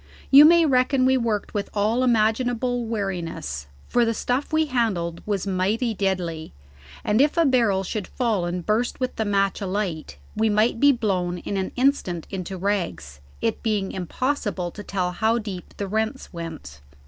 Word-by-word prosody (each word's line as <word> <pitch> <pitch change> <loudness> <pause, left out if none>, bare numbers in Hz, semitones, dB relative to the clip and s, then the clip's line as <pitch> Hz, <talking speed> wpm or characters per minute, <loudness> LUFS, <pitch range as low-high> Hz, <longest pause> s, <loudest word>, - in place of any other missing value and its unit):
You 280 +2 +10
may 335 +1 +6
reckon 255 -1 +3
we 260 0 +4
worked 230 -5 -1
with 205 -1 -2
all 220 +5 +1
imaginable 245 +1 +1
wariness, 175 - -4 0.2
for 240 - +2
the 230 -1 0
stuff 250 +7 -1
we 315 0 +3
handled 205 - -1
was 200 -3 -1
mighty 200 +5 0
deadly, 180 -5 -2 0.5
and 210 +4 +3
if 295 +4 +2
a 335 - +4
barrel 230 -8 +3
should 205 +1 -4
fall 225 -8 -1
and 175 0 -3
burst 225 +3 0
with 255 -1 -2
the 220 - 0
match 195 0 +1
alight, 185 - -3 0.2
we 220 0 +2
might 215 +2 +2
be 285 +2 +6
blown 190 -8 -1
in 200 - -5
an 190 -1 -2
instant 250 - +1
into 190 -1 -5
rags, 170 - -2 0.2
it 225 - -1
being 210 -4 -1
impossible 190 - -2
to 205 - -9
tell 185 -3 -2
how 220 +5 +1
deep 200 -6 -7
the 200 - -3
rents 220 +5 -2
went. 160 - -8
210 Hz, 170 wpm, -24 LUFS, 185-245 Hz, 0.5 s, You